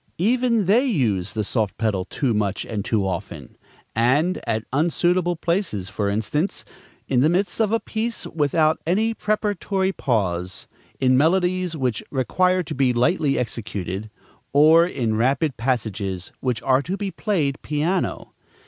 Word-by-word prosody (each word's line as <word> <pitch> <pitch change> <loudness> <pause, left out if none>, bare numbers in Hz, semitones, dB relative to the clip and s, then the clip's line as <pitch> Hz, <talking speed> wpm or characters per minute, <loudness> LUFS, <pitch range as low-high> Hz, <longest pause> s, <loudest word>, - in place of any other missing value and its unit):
Even 235 +2 +2
they 220 +8 +4
use 110 - 0
the 110 -1 -1
soft 110 -1 -1
pedal 105 -4 0
too 130 -5 -1
much 105 -2 -1
and 105 -3 -3
too 105 -2 0
often, 90 -3 -5 0.4
and 140 +11 +2
at 110 0 -1
unsuitable 175 +3 +1
places; 165 - -2
for 100 0 -1
instance, 110 - -1 0.4
in 130 - +2
the 145 +5 +4
midst 185 +4 0
of 215 -2 +2
a 225 - +2
piece, 225 +1 -3
without 155 0 +1
any 220 +6 +2
preparatory 205 -3 -1
pause; 95 - -2 0.3
in 130 -1 +3
melodies 180 +3 +2
which 125 -5 -1
require 180 +8 +1
to - - -6
be 130 -2 +2
lightly 140 +3 +2
executed; 105 -4 -4 0.4
or 160 +4 +6
in 115 -10 -1
rapid 135 +4 +1
passages 105 -7 -2
which 125 -2 -2
are 130 +1 +3
to 180 +7 -4
be 200 -2 -3
played 160 -12 -1
piano. 160 +5 -2
140 Hz, 145 wpm, -23 LUFS, 110-185 Hz, 0.4 s, or